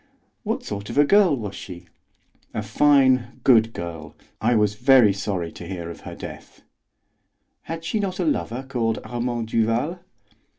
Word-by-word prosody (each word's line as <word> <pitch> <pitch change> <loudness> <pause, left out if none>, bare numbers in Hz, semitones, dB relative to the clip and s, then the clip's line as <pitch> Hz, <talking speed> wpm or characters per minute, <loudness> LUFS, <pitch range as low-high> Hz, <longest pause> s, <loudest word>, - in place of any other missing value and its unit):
"What - - -3
sort 100 0 -6
of - - -5
a 145 - +6
girl 195 -2 +5
was 105 -4 -5
she?" 90 -3 -9 0.7
"A - - -2
fine, 130 -5 +3
good 115 -3 +5
girl. 80 -6 -7 0.3
I 120 +3 +3
was 105 -2 +2
very 120 -2 +5
sorry 95 -4 -3
to 85 - -10
hear 85 -2 -5
of - - -11
her - - -9
death." - - -10 1.1
"Had 165 0 -5
she 215 +6 -1
not 190 -3 -2
a - - 0
lover 135 - -1
called 115 -4 -1
Armand 120 0 -3
Duval?" 115 +10 0
115 Hz, 160 wpm, -23 LUFS, 100-135 Hz, 1.1 s, a